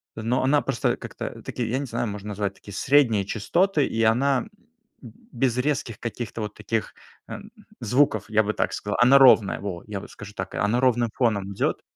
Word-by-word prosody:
но 115 +4 -1
она 145 +2 +3
просто 135 -4 -1
как-то, - - -7
такие, 120 -2 -4
я 130 - 0
не 140 - -3
знаю, 120 0 -3
можно 105 0 -6
назвать 100 -1 -2
такие 100 - -12
средние 125 -6 +3
частоты, 150 - +1
и 115 - -1
она 130 - +2 0.5
б 120 -4 -11 0.2
без 125 0 0
резких 125 -4 -1
каких-то 115 -1 -5
вот 105 -1 -4
таких, 110 +1 -3 0.4
эм, 210 - -9 0.3
звуков, 115 -3 +2
я 110 0 +3
бы 105 +1 -2
так - - -1
сказал. 105 0 -3
Она 130 +3 +7
ровная, 125 -7 +6
во. 95 -4 -5
Я 100 -2 -4
вот - - -12
скажу 105 -1 -11
так: - - -5
она 105 +4 +1
ровным 120 -3 +2
фоном 100 -5 0
идет. - - -1
115 Hz, 190 wpm, -24 LUFS, 105-130 Hz, 0.5 s, Она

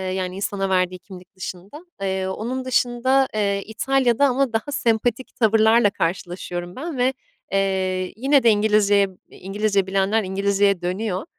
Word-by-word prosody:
yani, 185 -1 -3
insana 195 0 -2
verdiği 185 -1 0
kimlik 180 +1 -14
dışında. 190 - -8 0.2
Eee, 190 -1 -1
onun 240 +7 -4
dışında, 255 +1 +2
eee, 200 -2 0
İtalya'da 260 +3 +1
ama 265 -1 0
daha 225 +6 -2
sempatik 235 0 -1
tavırlarla 220 0 +4
karşılaşıyorum 175 0 -4
ben 300 +1 -5
ve, 255 +2 +2 0.4
eee, 190 -1 -1
yine 270 +4 +3
de 235 - +6
İngilizceye 205 -1 +3 0.2
İngilizce 200 0 -1
bilenler 195 +3 +1
İngilizceye 200 0 +1
dönüyor. 185 +2 -3
205 Hz, 130 wpm, -22 LUFS, 190-240 Hz, 0.4 s, de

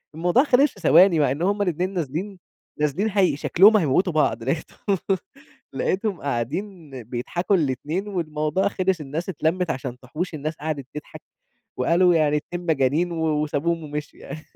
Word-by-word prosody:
الموضوع 175 - +3
خلِص 280 0 +4
في - - -16
ثواني، 170 0 +5
مع 145 -3 +3
إن 145 +5 -3
هُم 205 +3 +1
الإتنين 180 0 -1
نازلين 180 +4 -4 0.4
نازلين 150 +9 0
هي 195 -7 +2
شكْلهم 205 +8 +5
هيموِّتوا 175 +1 +1
بعض، 140 -6 +1
لقيتهم 165 - -2 0.8
لقيتهم 195 -2 -1
قاعدين 150 - -4
بيضحَكوا 150 - -1
الإتنين 155 - -1
والموضوع 155 -2 -1
خلِص، 190 -3 0
الناس 150 +5 -5
اتلمِّت 175 +1 -1
عشان 130 -2 -6
تحُوش، 155 +8 -5
الناس 155 +1 -4
قعَدِت 150 -3 -4
تضحَك 150 - -9 0.6
وقالوا 170 +7 +3
يعني 150 -2 +3
إتنين 175 +4 -6
مجانين 155 +2 +1
و 165 -1 -2 0.2
وسابوهم 160 +3 -1
ومشيوا 150 0 -7
يعني. 150 +2 -8
165 Hz, 150 wpm, -23 LUFS, 150-185 Hz, 0.8 s, ثواني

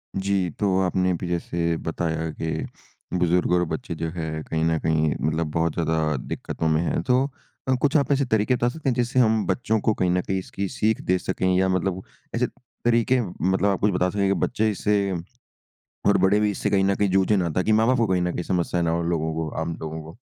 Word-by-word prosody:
जी। 95 -2 0
तो 95 -3 +2
आपने 90 0 +1
अभी 90 0 -3
जैसे 85 -1 -1
बताया 80 -1 -2
कि 80 0 -2 0.5
बुज़ुर्ग 90 0 +2
और 90 - +3
बच्चे 105 -1 -4
जो 80 0 -3
हैं, 80 -2 -4
कहीं 80 0 -2
न 80 -1 +2
कहीं 80 -2 +1
मतलब 80 +2 0
बहुत 80 0 0
ज़्यादा 80 -2 0
दिक्कतों 75 +5 -4
में 80 +1 +2
हैं। 85 - 0
तो 125 +5 +3 0.5
अ, - - +4
कुछ 145 0 +2
आप 140 -1 0
ऐसे 140 0 +2
तरीके 110 +1 +2
बता 120 0 +1
सकते 145 +2 -3
हैं, 125 - +2
जिससे 125 +1 +1
हम 110 -3 +3
बच्चों 110 -3 0
को 110 - +2
कहीं 90 -2 0
न 90 0 +2
कहीं 95 +1 -2
इसकी 100 +1 -4
सीख 110 +3 0
दे 90 - +1
सकें 95 0 -2
या 95 0 +3
मतलब 95 0 0 0.3
ऐसे - - +1
तरीके, 120 +2 0
मतलब 95 -1 -1
आप 95 - 0
कुछ 105 - +3
बता 90 0 +1
सकें 100 0 0
कि 100 - +3
बच्चे 110 -2 0
इससे 100 0 0 1.0
और - - +5
बड़े 100 +2 +3
भी 105 -1 +2
इससे 100 - -2
कहीं 95 -1 +3
न 100 0 +2
कहीं 100 -1 +1
जूझे 95 +2 +3
ना, 85 -2 0
ताकि 90 +7 0
माँ-बाप 115 +4 +4
को 115 -2 +2
कहीं 90 -2 +1
न 90 0 0
कहीं 90 - -3
समस्याएँ 90 -1 0
ना 80 - +1
हो? 85 - 0
उन 85 0 -1
लोगों 80 -1 -1
को 80 -1 -2
आम 80 0 -3
लोगों 80 0 -5
को? 80 +5 -12
90 Hz, 230 wpm, -24 LUFS, 85-105 Hz, 1.0 s, और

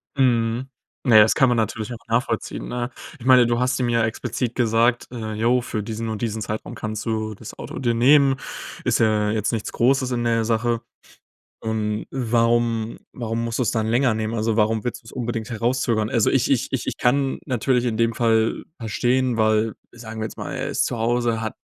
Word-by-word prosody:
Mhm. 120 -1 +1 0.4
Ja, 110 -4 +8
das 110 - +4
kann 130 - +5
man 120 - +2
natürlich 110 +1 -2
auch - - -6
nachvollziehen, 115 0 -1
ne? 120 0 -3 0.3
Ich 120 - -11
meine, 130 -2 +7
du 120 0 +1
hast 125 +1 +1
ihm 125 - +1
ja 115 -1 +2
explizit 120 +1 -3
gesagt: 120 0 +2
„Äh, 110 -3 -5
jo, 120 +3 +2
für 110 -3 -3
diesen 110 +2 -4
und 110 -1 -4
diesen 110 -2 -2
Zeitraum 110 +1 -5
kannst 110 -1 -5
du 110 -1 -2
das 100 - -11
Auto - - -7
dir 120 -3 +1
nehmen“, 135 +3 +5 0.5
ist - - +1
ja 105 -2 +2
jetzt 110 +1 -1
nichts 110 -2 -3
Großes 130 +1 +2
in 120 -1 -1
der 115 -1 +2
Sache. 115 +1 0 0.8
Und 110 -1 -2
warum 115 -2 +1
warum 115 -1 -3
musst 115 +1 -3
du - - +3
es 110 - 0
dann 110 -1 0
länger 120 +1 +2
nehmen? 110 0 -2
Also 110 0 0
warum 110 0 +2
willst 120 - -4
du - - -34
es - - -11
unbedingt 120 -1 -4
herauszögern? 115 -1 0
Also, 115 -2 +2
ich 135 0 +2
ich 130 - +2
ich 130 - -2
ich - - -3
kann 135 +2 +1
natürlich 125 -1 +1
in 115 -3 -1
dem 115 0 +2
Fall 115 -1 +1 0.2
verstehen 120 +2 0
weil 110 0 +2 0.2
sagen 115 -2 -9
wir 110 - -2
jetzt - - -8
mal, - - -5
er - - -3
ist - - 0
zu 120 - -3
Hause, 115 0 0
hat 110 -1 -3
115 Hz, 210 wpm, -23 LUFS, 110-120 Hz, 0.8 s, Ja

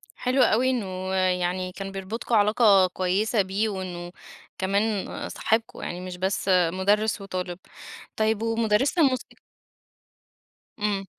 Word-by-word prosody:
حلو 255 +1 +1
أوي 245 +4 +3
إنه 190 -6 -3
يعني 185 0 0
كان 195 +1 -7
بيربطكم 200 +5 -3
علاقة 205 -2 +5
كويسة 195 +5 0
بيه 195 +3 -1
وإنه 180 -3 -5 0.5
كمان 200 +2 0 0.2
صاحبكم، 225 +1 -1
يعني 175 +1 -5
مش 180 -1 -7
بس 190 +1 -1 0.2
مُدرس 205 +4 +1
وطالب. 185 -2 -5 0.6
طيب، 220 0 +1
ومُدرسة 225 - +1
الموِسيقى؟ 260 -4 0 1.4
إمم. 205 -2 -1
195 Hz, 115 wpm, -25 LUFS, 185-220 Hz, 1.4 s, علاقة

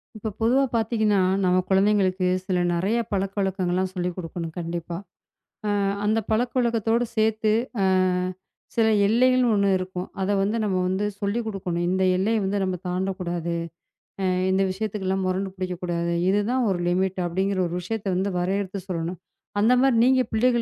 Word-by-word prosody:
இப்ப 215 0 -4
பொதுவா 250 +5 +4
பாத்தீங்கன்னா, 220 -3 +2 0.2
நம்ம 180 0 +3
குழந்தைகளுக்கு 190 -1 +3 0.2
சில 185 -1 0
நிறைய 195 +7 0
பழக்கவழக்கங்கள் 195 -2 -1
எல்லாம் 185 0 0
சொல்லிக் 180 -1 -2
கொடுக்கணும் 165 -2 -5
கண்டிப்பா. 170 0 -4 0.7
அ - - +1 0.3
அந்த 215 +2 +2
பழக்கவழக்கத்தோடு 235 0 +1
சேர்த்து, 220 0 +2 1.2
சில 225 -1 +4 0.2
எல்லைகள்னு 250 +3 +4
1 200 -1 +2
இருக்கும், 185 0 -5 0.2
அத 190 - 0
வந்து 205 +3 0
நம்ம 195 -3 0
வந்து 190 +2 0 0.2
சொல்லிக் 220 +3 -1
கொடுக்கணும், 180 -5 -2
இந்த 190 +1 +1
எல்லையை 215 +4 +1
வந்து 200 +1 0
நம்ம 185 -1 -1
தாண்டக்கூடாது, 180 -2 -2 0.7
அ - - +1 0.3
இந்த 190 +1 +3
விஷயத்துக்கு 205 0 -3
எல்லாம் 190 0 0
முரண்டு 190 +1 -1
பிடிக்கக்கூடாது 175 -2 -2 0.2
இதுதான் 225 +5 +1
1 175 - -1
லிமிட் 190 +1 0
அப்படிங்கிற 190 +2 0
1 170 - -4
விஷயத்தை 205 +1 -3
வந்து 190 +2 0
வரையறுத்து 190 +1 -2
சொல்லணும். 170 -1 -3 0.4
அந்த 230 +4 +5
மாதிரி 265 -4 +4
நீங்க 260 0 +4
பிள்ளைகள் 240 +1 +3
195 Hz, 145 wpm, -24 LUFS, 185-220 Hz, 1.2 s, அந்த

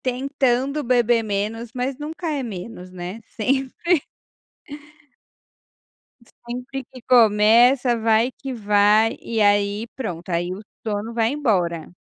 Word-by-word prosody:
tentando 265 +2 0
beber 240 -1 +3
menos, 215 +3 -3
mas 255 +2 -3
nunca 320 +3 -5
é 285 -3 -2
menos, 185 -3 -8
né, 185 +4 -7
sempre 270 - 0 2.5
sempre 250 +3 -6
que 255 -2 -12
começa, 235 +2 +5
vai 225 +2 +2
que 270 0 -7
vai 210 0 +3
e 225 -1 -2
aí 205 +2 +2
pronto, 180 -9 -6
aí 175 +1 -1
o 195 - -8 0.2
sono 215 +1 -3
vai 230 -1 +1
embora. 180 - -1
230 Hz, 115 wpm, -22 LUFS, 205-255 Hz, 2.5 s, começa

